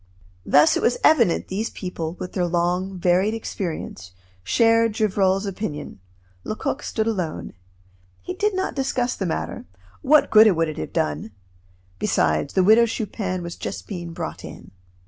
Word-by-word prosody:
Thus 315 0 +5
it - - 0
was - - +2
evident 300 - +4
these 210 +4 -2
people, 170 -3 -5
with 180 - -7
their 180 -2 0
long, 180 +2 -1
varied 185 +5 +2
experience, 160 - -5 0.3
shared 230 - +3
Gevrol's 195 -2 +1
opinion; 170 - -5 0.4
Lecoq 255 +5 -3
stood 220 -5 -2
alone. 185 -8 -3 0.7
He 365 - -4
did 415 +2 0
not 375 - -1
discuss 260 -2 -1
the - - -3
matter - - -4 0.4
what 300 +1 +4
good 215 0 +8
would 165 0 +1
it 155 - -6
have 80 - -5
done? 75 +8 -2 0.7
Besides, 75 -2 0
the 185 - +4
Widow 220 +4 +6
Chupin 195 -5 -3
was 170 0 -6
just - - -6
being 175 -4 -6
brought 165 - -6
in. - - -11
190 Hz, 150 wpm, -23 LUFS, 170-225 Hz, 0.7 s, good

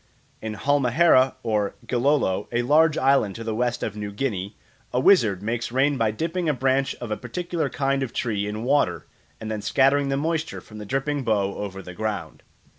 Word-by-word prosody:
In 110 -1 -4
Halmahera, 135 +2 +3
or 105 -3 0
Gilolo, 125 -6 +1
a 120 0 0
large 155 +4 +4
island 135 -7 +2
to 115 - -6
the 115 -1 -3
west 120 +2 -1
of 105 - -3
New 105 -1 -5
Guinea, 100 -3 -3 0.3
a 125 - +1
wizard 110 - +4
makes 115 +2 -2
rain 135 +3 +2
by 115 -4 +1
dipping 165 +9 -2
a 150 - +1
branch 135 +1 +1
of 120 -3 -7
a 105 - -1
particular 170 +7 -3
kind 135 -1 0
of 130 -3 -3
tree 105 -4 -2
in 105 +2 -4
water 140 +3 +1 0.3
and 110 0 -5
then 105 -1 -3
scattering 140 +5 +3
the 135 - 0
moisture 160 +2 -2
from 110 -1 -12
the 105 - -8
dripping 135 +3 -1
bough 100 -4 +1
over 95 -1 -6
the 90 - -9
ground. 100 -5 -4
120 Hz, 190 wpm, -24 LUFS, 105-140 Hz, 0.3 s, large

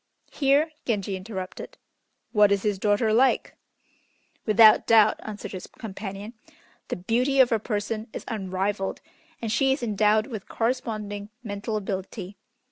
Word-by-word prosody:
Here 290 +3 +2
Genji 200 -4 -1
interrupted. 190 -1 -7 0.5
"What 210 -3 +5
is 200 -1 +1
his 205 -2 0
daughter 210 +2 +2
like?" 260 +4 +2 0.9
"Without 215 0 +7
doubt," 220 -2 +5
answered 210 -1 -7
his 185 -2 -7
companion, 200 0 -7 0.5
"the - - -2
beauty 245 +9 +1
of 255 -2 +6
her 225 - +2
person 215 +1 -3
is - - -7
unrivalled, 195 -1 -2 0.4
and 225 - -1
she 270 +4 +3
is 270 - -5
endowed 215 0 +2
with 220 -6 -7
corresponding 215 -4 -2
mental 210 0 -3
ability. 195 0 -5
215 Hz, 130 wpm, -26 LUFS, 200-230 Hz, 0.9 s, Without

